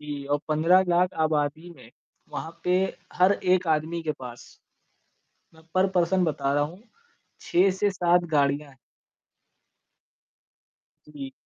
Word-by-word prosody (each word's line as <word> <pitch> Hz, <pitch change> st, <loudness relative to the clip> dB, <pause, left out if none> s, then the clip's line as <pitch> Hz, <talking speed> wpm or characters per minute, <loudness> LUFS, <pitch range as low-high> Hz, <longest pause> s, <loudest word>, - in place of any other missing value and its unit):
जी। 145 Hz, -2 st, -6 dB
और 145 Hz, +1 st, +1 dB
15 165 Hz, +5 st, +4 dB
लाख 180 Hz, +1 st, +2 dB
आबादी 155 Hz, +2 st, -1 dB
में, 120 Hz, -8 st, -15 dB, 0.4 s
वहाँ 165 Hz, +1 st, -7 dB
पे 180 Hz, 0 st, +3 dB, 0.4 s
हर 185 Hz, +2 st, +4 dB
एक 185 Hz, -2 st, +1 dB
आदमी 160 Hz, +2 st, 0 dB
के 155 Hz, -1 st, -1 dB
पास। 125 Hz, -2 st, -10 dB, 1.1 s
मैं 160 Hz, -, -19 dB
पर 185 Hz, +1 st, +4 dB
पर्सन 180 Hz, 0 st, +2 dB
बता 140 Hz, -4 st, -1 dB
रहा 145 Hz, -, +2 dB
हूँ, 170 Hz, +7 st, -6 dB, 0.6 s
6 185 Hz, +3 st, +3 dB
से 200 Hz, +2 st, 0 dB
7 175 Hz, -2 st, +2 dB
गाड़ियाँ 140 Hz, 0 st, +1 dB
हैं। 135 Hz, -, -20 dB, 2.3 s
जी। 140 Hz, -3 st, -8 dB
160 Hz, 130 wpm, -25 LUFS, 145-180 Hz, 2.3 s, 15